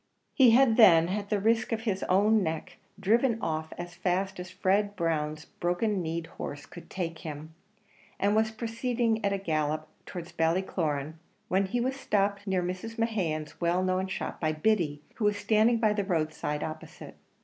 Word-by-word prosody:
He 260 -3 +6
had 230 -1 +5
then, 170 -7 +7
at 200 +1 -3
the 210 - +1
risk 225 +3 +1
of 225 -1 -1
his 205 -4 -1
own 210 +4 +4
neck, 160 -3 -4 0.2
driven 225 +4 +2
off 160 -4 -3
as 175 0 -6
fast 185 +2 -1
as 180 0 -6
Fred 200 +2 +1
Brown's 155 -3 -1
broken 185 +3 -1
knee'd 165 0 -3
horse 145 -2 -7
could 175 - -12
take 165 -3 -4
him, 155 0 -7 0.7
and 200 +2 +2
was 220 0 +3
proceeding 230 0 -1
at 200 - +2
a 200 - 0
gallop 155 -4 -1 0.2
towards 175 -1 -7
Ballycloran, 160 -3 -1 0.3
when 190 +2 +2
he 240 +6 -1
was 260 +3 0
stopped 205 -5 0
near 190 -2 +1
Mrs. 185 +6 -5
Mehan's 180 -11 -2
well 175 +2 +2
known 185 0 0
shop 190 - -5
by 155 -1 +1
Biddy, 155 -4 0
who 220 - -1
was 210 -1 +2
standing 215 +3 +3
by 220 -2 +2
the 205 -1 -1
road 160 -5 0
side 150 0 -3
opposite. 155 0 -8
190 Hz, 175 wpm, -29 LUFS, 165-215 Hz, 0.7 s, then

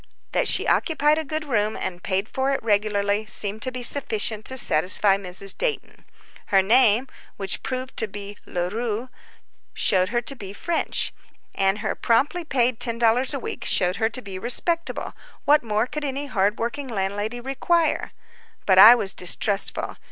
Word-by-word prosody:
That - - +1
she - - +3
occupied 305 -2 +2
a - - -3
good 310 +1 -4
room 215 -6 -1
and 175 -1 -5
paid 190 +2 -2
for 265 +3 -2
it 275 -3 -2
regularly 205 -1 0
seemed 210 0 +1
to 255 - -1
be 250 -1 -6
sufficient 220 -5 0
to 260 - -1
satisfy 190 +1 +4
Mrs. 195 0 -2
Dayton. - - -4 0.4
Her 195 -2 +3
name, 235 +2 +3 0.3
which 195 -2 +1
proved 255 0 -5
to 225 - +1
be 205 0 -8
Leroux, 215 +7 -3 0.7
showed 185 0 +2
her 240 +1 0
to 240 +3 -2
be 200 -5 -9
French, 335 +10 -1 0.4
and 195 +1 0
her 205 - 0
promptly 285 +10 0
paid 250 -6 0
$10 235 +3 +2
a - - -1
week 260 - -6
showed 180 0 +1
her 220 0 +1
to 255 +2 -5
be 195 -2 -7
respectable—what 300 - 0
more 215 -1 -1
could 300 +4 -6
any 280 0 -3
hard 210 -5 0
working 250 +5 -4
landlady 205 +1 -3
require? 275 +7 -1 0.5
But 190 -1 +4
I 225 +5 +10
was 195 -5 +1
distrustful. 195 +3 -1
225 Hz, 160 wpm, -23 LUFS, 200-260 Hz, 0.7 s, I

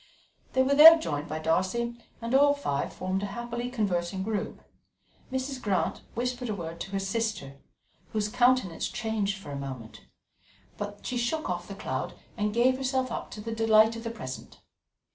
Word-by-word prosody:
They 260 - +4
were 275 +2 +2
there 320 +3 +11
joined 150 - -3
by 155 - -3
Darcy, 185 +9 0 0.3
and 230 +2 -2
all 285 +1 +6
five 145 - -2
formed 185 +1 -2
a 205 - -2
happily 240 +3 -4
conversing 190 -5 -1
group. 215 0 -3 0.7
Mrs. 260 0 -3
Grant 195 -3 0
whispered 250 0 -2
a 210 - -1
word 170 -2 -6
to 195 +3 -6
her 195 - 0
sister, 195 -9 -2 0.5
whose 210 -1 0
countenance 245 -6 +2
changed 210 -3 -1
for 195 -7 -9
a - - -4
moment; 130 -5 -7 0.7
but 205 0 -6
she 250 - -2
shook 275 +7 -1
off - - -4
the - - -7
cloud - - -4 0.2
and 210 -1 0
gave 245 +4 +3
herself 260 -1 -1
up - - -4
to 210 - -8
the 225 +1 -4
delight 225 0 +5
of 230 - -7
the 230 - -3
present. 165 - -8
220 Hz, 175 wpm, -28 LUFS, 190-245 Hz, 0.7 s, there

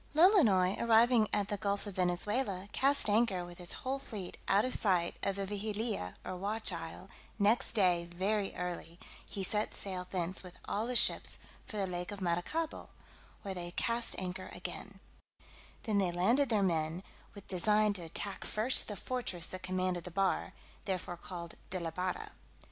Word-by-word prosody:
Lolonois 235 - +5
arriving 230 0 +5
at 205 -1 0
the 205 - -1
gulf 200 +1 -1
of 205 - -6
Venezuela, 190 +2 0
cast 280 -1 +3
anchor 205 -4 +2
with 175 0 -11
his 175 - -1
whole 270 +1 -1
fleet 205 -8 -6
out 200 +3 +4
of 255 - -1
sight 180 -5 +2
of 195 -1 0
the 200 0 -2
Vigilia 210 - -2
or 185 - -4
Watch 205 +2 0
Isle; 165 +2 -7 0.3
next 215 +3 +3
day 180 -5 +3
very 195 +4 0
early 175 -1 -5 0.3
he 195 - -3
set 210 +2 +1
sail 185 -2 -3
thence 180 0 -1
with 180 -1 -11
all 215 +3 -1
his 250 -1 +3
ships - - +4 0.3
for 215 - -5
the 200 - +1
lake 180 0 -3
of 205 - -6
Maracaibo, 185 - -2 0.5
where 195 - -3
they 175 -1 -4
cast 230 +6 +1
anchor 185 0 -4
again; - - -6 0.8
then 215 -3 +1
they 185 -3 +2
landed 230 +11 +3
their 215 -4 +2
men, 165 0 0 0.3
with 200 - -11
design 210 +3 +3
to 190 - -3
attack 185 +4 -4
first 225 +5 +3
the 210 - -4
fortress 200 -7 -3
that 185 - -6
commanded 185 -2 -1
the 180 - -7
bar, 195 +2 0 0.3
therefore 185 -2 -2
called 170 -1 -7 0.2
de 185 - -2
la 165 -1 -3
barra. 180 +2 -3
195 Hz, 170 wpm, -33 LUFS, 180-215 Hz, 0.8 s, Lolonois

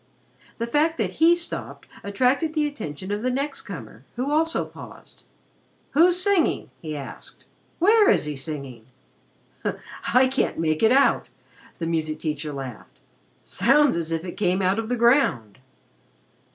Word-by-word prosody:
The 230 - -2
fact 305 +7 +1
that - - -2
he 335 +1 +7
stopped 345 -1 -6 0.2
attracted 260 +10 +1
the 305 -1 +2
attention 190 - -6
of 205 +1 -2
the 255 - 0
next 275 +3 -2
comer, 125 - -9
who 255 +4 -2
also 320 +2 +1
paused. - - -13 0.7
"Who's 345 +5 +4
singing?" 380 -3 +1
he 155 -2 -5
asked. 140 - -10 0.3
"Where 420 +4 +5
is - - +3
he 150 -1 -4
singing?" 135 -5 -7 1.2
"I 260 +1 +5
can't 265 +1 -1
make 155 -1 0
out," 260 +5 +4 0.5
the 165 - -3
music 155 -2 -2
teacher 150 -1 -3
laughed. 135 -5 -8 0.5
"Sounds 285 - +3
as 165 -1 -3
if 165 +1 -2
it 175 - -7
came 185 -2 +1
out 190 +4 +2
of 225 0 -4
the 245 - 0
ground." 235 - +2
220 Hz, 145 wpm, -24 LUFS, -, 1.2 s, he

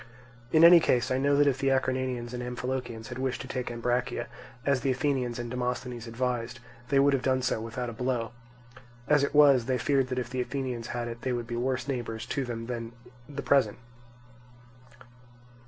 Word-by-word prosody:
In 160 0 +5
any 170 0 +10
case 125 -7 +1
I 130 - +2
know 140 +1 +3
that 145 +1 +5
if 135 -2 +2
the 135 - 0
Acarnanians 130 -2 -1
and 125 - -4
Amphilochians 125 -2 -4
had 120 0 -6
wished 130 -3 -1
to 130 - -8
take 130 -1 -3
Ambracia 120 +1 -1 0.4
as 140 -3 +2
the 135 - 0
Athenians 130 -2 0
and 120 -1 -5
Demosthenes 125 -1 -3
advised, 120 +1 -2 0.3
they 140 - +3
would 140 +1 +5
have 135 - +1
done 130 -1 +1
so 120 -3 0
without 115 +2 -4
a 120 - -5
blow; 125 -2 -2 0.8
as 150 -1 +4
it 140 - -1
was, 140 -5 +6
they 130 0 +1
feared 135 -1 +1
that 125 - -4
if 125 -1 -3
the 130 -1 -1
Athenians 125 -3 -3
had 120 -1 -3
it 115 0 -7
they 130 - -1
would 120 -1 -2
be 120 0 -5
worse 130 +1 -1
neighbours 115 -4 -3
to 135 +3 -2
them 115 -2 -5
than 115 -1 -5 0.4
the 140 -1 -5
present. 140 -1 +3
125 Hz, 195 wpm, -28 LUFS, 120-135 Hz, 0.8 s, any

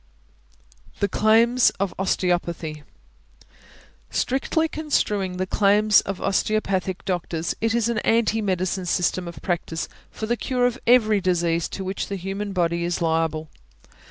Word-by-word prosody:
THE 200 - +2
CLAIMS 230 +4 +4
OF 195 -2 -1
OSTEOPATHY. 175 -5 -1 1.3
Strictly 275 +5 0
construing 210 - -1
the 185 - -1
claims 210 +2 +4
of 195 -1 -5
osteopathic 195 -2 -1
doctors, 170 -2 -2
it 225 0 +1
is 235 -1 +2
an 235 -2 0
anti 225 -1 +2
medicine 185 -1 -1
system 180 +1 0
of 170 - -9
practice 170 -3 -2 0.2
for 220 - -5
the 240 +2 0
cure 250 0 0
of 245 +1 0
every 220 -4 +5
disease 170 -2 +1
to 195 - -5
which 190 +1 -3
the 200 - -4
human 195 +2 -4
body 170 -2 0
is 175 0 -1
liable. 160 -2 -1
195 Hz, 135 wpm, -23 LUFS, 175-215 Hz, 1.3 s, every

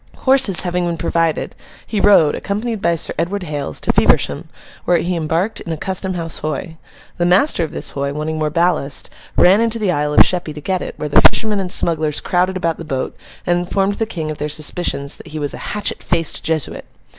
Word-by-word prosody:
Horses 260 -9 +4
having 180 -1 -1
been 170 -1 -2
provided, 165 0 -1 0.3
he 215 - -2
rode, 195 -7 +5
accompanied 215 +2 -3
by 170 0 +2
Sir 165 - -2
Edward 185 +4 -2
Hales, 145 -4 -4
to - - +1
Feversham, - - +2 0.4
where 175 - +3
he 175 +2 -1
embarked 170 +6 -1
in 170 - -6
a 160 - -2
Custom 190 +2 -3
House 165 -2 -4
Hoy. 155 +2 -4 0.4
The 175 - +1
master 180 - +3
of 160 - -4
this - - -3
Hoy, 140 0 -2
wanting 155 +2 -3
more 155 -1 0
ballast, 160 -3 +1 0.3
ran 190 +5 +6
into 230 0 0
the 210 -5 0
Isle 150 -2 -1
of - - +8
Sheppy 175 -4 -2
to - - -6
get 185 +5 -2
it, - - -6
where 150 - -3
the 145 - +5
fishermen 215 -3 +4
and 185 -2 -3
smugglers 155 -3 +1
crowded 185 +1 0
about 170 -3 -1
the - - -6
boat, 135 -4 -3 0.3
and 175 -1 +2
informed 195 +3 0
the 225 - 0
King 160 -7 -4
of 150 - -8
their 150 - -2
suspicions 150 -1 -1
that - - -13
he 155 0 -7
was 145 -2 -3
a - - -7
'hatchet 205 0 -1
faced 165 -2 0
Jesuit. 160 -3 -2
170 Hz, 215 wpm, -18 LUFS, 155-190 Hz, 0.4 s, of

